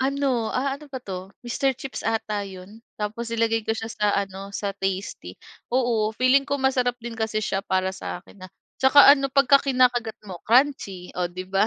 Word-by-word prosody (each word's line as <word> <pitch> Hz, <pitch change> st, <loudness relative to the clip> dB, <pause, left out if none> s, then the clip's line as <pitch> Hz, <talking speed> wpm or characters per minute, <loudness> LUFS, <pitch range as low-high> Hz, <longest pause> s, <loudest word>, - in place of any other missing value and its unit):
Ano, 265 Hz, -4 st, 0 dB
ah, 275 Hz, +2 st, -1 dB
ano 300 Hz, -, -13 dB
ba 260 Hz, -3 st, -7 dB
'to? 190 Hz, -1 st, -7 dB
Mister 260 Hz, +2 st, 0 dB
Chips 265 Hz, -1 st, -7 dB
ata 215 Hz, -2 st, -1 dB
'yun 190 Hz, +3 st, -11 dB, 0.2 s
tapos 225 Hz, +2 st, -4 dB
nilagay 225 Hz, -1 st, 0 dB
ko 220 Hz, -, +1 dB
siya 225 Hz, 0 st, -5 dB
sa 210 Hz, -2 st, 0 dB
ano 195 Hz, 0 st, -4 dB
sa 200 Hz, 0 st, -2 dB
tasty, 190 Hz, -, -4 dB, 0.4 s
oo 230 Hz, -4 st, +1 dB
feeling 255 Hz, +4 st, +3 dB
ko 285 Hz, -, -1 dB
masarap 265 Hz, -3 st, +1 dB
din 235 Hz, -1 st, -7 dB
kasi 220 Hz, -1 st, -1 dB
siya 195 Hz, 0 st, -2 dB
para 190 Hz, 0 st, +1 dB
sa 185 Hz, -1 st, -6 dB
akin, 185 Hz, -1 st, -13 dB
ah, -, -, -20 dB, 0.3 s
'tsaka 275 Hz, +1 st, +8 dB
ano 275 Hz, -1 st, +4 dB
pagka 275 Hz, 0 st, +5 dB
kinakagat 250 Hz, -4 st, +2 dB
mo 190 Hz, -4 st, -8 dB
crunchy 230 Hz, -8 st, +2 dB
o 180 Hz, -, +1 dB
'di 180 Hz, +1 st, -7 dB
ba? 195 Hz, +2 st, +3 dB
225 Hz, 190 wpm, -24 LUFS, 195-260 Hz, 0.4 s, tsaka